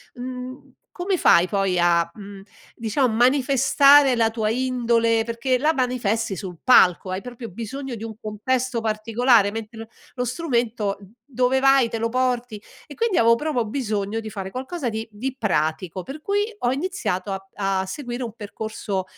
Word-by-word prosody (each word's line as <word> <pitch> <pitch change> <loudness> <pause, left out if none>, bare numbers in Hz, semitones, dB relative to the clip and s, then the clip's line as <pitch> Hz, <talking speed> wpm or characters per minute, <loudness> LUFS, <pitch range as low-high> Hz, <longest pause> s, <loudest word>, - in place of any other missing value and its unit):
mhmm, 255 +1 -8 0.2
come 365 +1 -1
fai 170 - +5
poi 195 -3 0
a, 170 -1 +3
mhmm, 200 -1 -10 0.3
diciamo 230 +2 0
manifestare 270 +2 +5
la 225 -1 +2
tua 220 -1 -1
indole 230 -2 +1
perché 235 +2 0
la 310 +3 +2
manifesti 230 - -1
sul 180 -4 -7
palco, 185 -7 +5
hai 185 - -2
proprio 245 -1 -8
bisogno 245 +5 -6
di 225 - -7
un 220 -2 -7
contesto 240 +3 -2
particolare, 220 0 +2
mentre 225 +1 -7
lo 225 - -8 0.3
lo 250 - -1
strumento, 235 -7 -1
mhmm, 195 - -15 0.2
dove 255 -1 +1
vai 270 -3 +4
te 230 - -3
lo 230 +1 0
porti. 245 -3 -1 0.3
E 290 - -11
quindi 455 -5 0
avevo 230 0 +5
proprio 250 -3 -1
bisogno 215 -3 -2
di 220 - -7
fare 195 -2 -6
qualcosa 265 +2 -4
di 220 0 -4
di 250 +5 -4
pratico. 175 -2 -1
Per 275 - -9
cui 405 +4 0
ho 245 - +1
iniziato 270 - -2
a 195 0 -7 0.3
a - - -4
seguire 245 +4 -5
un 230 - -6
percorso, 210 -2 -5
230 Hz, 165 wpm, -23 LUFS, 210-255 Hz, 0.3 s, fai